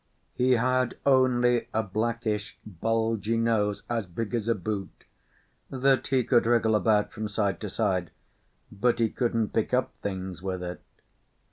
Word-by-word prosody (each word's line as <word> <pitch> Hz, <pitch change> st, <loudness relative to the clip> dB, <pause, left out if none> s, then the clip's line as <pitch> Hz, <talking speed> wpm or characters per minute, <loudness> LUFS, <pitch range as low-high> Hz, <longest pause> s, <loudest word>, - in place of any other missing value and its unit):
He 130 Hz, +1 st, +3 dB
had 125 Hz, +1 st, +1 dB
only 125 Hz, -3 st, +3 dB
a 110 Hz, -, +2 dB
blackish, 110 Hz, 0 st, -2 dB
bulgy 115 Hz, +3 st, -1 dB
nose, 110 Hz, -3 st, +1 dB
as 115 Hz, -5 st, -2 dB
big 105 Hz, +6 st, -5 dB
as 115 Hz, -2 st, -1 dB
a 115 Hz, -, +2 dB
boot, 100 Hz, +1 st, -5 dB, 0.7 s
that 135 Hz, 0 st, +2 dB
he 130 Hz, -2 st, +2 dB
could 120 Hz, -1 st, +3 dB
wriggle 115 Hz, -2 st, +3 dB
about 105 Hz, +1 st, +2 dB
from 110 Hz, -1 st, -4 dB
side 100 Hz, -1 st, -1 dB
to 105 Hz, -, -4 dB
side; 95 Hz, -5 st, 0 dB, 0.6 s
but 110 Hz, +4 st, +1 dB
he 115 Hz, -1 st, +2 dB
couldn't 115 Hz, -3 st, 0 dB
pick 110 Hz, +2 st, +1 dB
up 125 Hz, -, 0 dB
things 95 Hz, -3 st, -5 dB
with 95 Hz, -1 st, -3 dB
it. 90 Hz, 0 st, -6 dB
110 Hz, 150 wpm, -27 LUFS, 105-120 Hz, 0.7 s, He